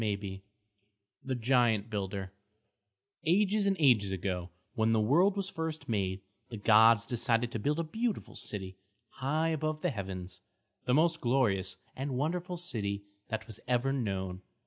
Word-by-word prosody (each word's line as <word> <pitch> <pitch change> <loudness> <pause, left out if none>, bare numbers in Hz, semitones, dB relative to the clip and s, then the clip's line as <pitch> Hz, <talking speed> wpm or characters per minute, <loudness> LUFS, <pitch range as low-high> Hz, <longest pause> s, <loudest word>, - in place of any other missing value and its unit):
CHAPTER 105 -2 +1
XI 95 -1 -7 0.8
THE 130 -1 -2
GIANT 120 -3 +2
BUILDER 100 -2 -3 0.9
Ages 200 +4 +3
and 195 - +3
ages 120 -9 +5
ago, 90 -1 -2 0.2
when 115 -2 +2
the 110 - +3
world 170 - +4
was 195 -1 -2
first 160 -1 -4
made, 95 -4 -1 0.3
the 115 - -6
gods 110 +1 +6
decided 120 0 +1
to 115 - -3
build 145 +9 0
a - - +1
beautiful 220 +7 -2
city 95 -2 -5 0.3
high 155 +5 0
above 155 -1 -2
the - - +2
heavens, 95 -4 -6 0.4
the 125 - +3
most 165 +2 +3
glorious 105 -8 +1 0.2
and 135 -1 -3
wonderful 175 +5 -1
city 100 - -2 0.2
that 110 -2 -3 0.2
ever 125 +2 +2
was 135 -1 0
known. 95 -3 -3
120 Hz, 150 wpm, -31 LUFS, 100-155 Hz, 0.9 s, gods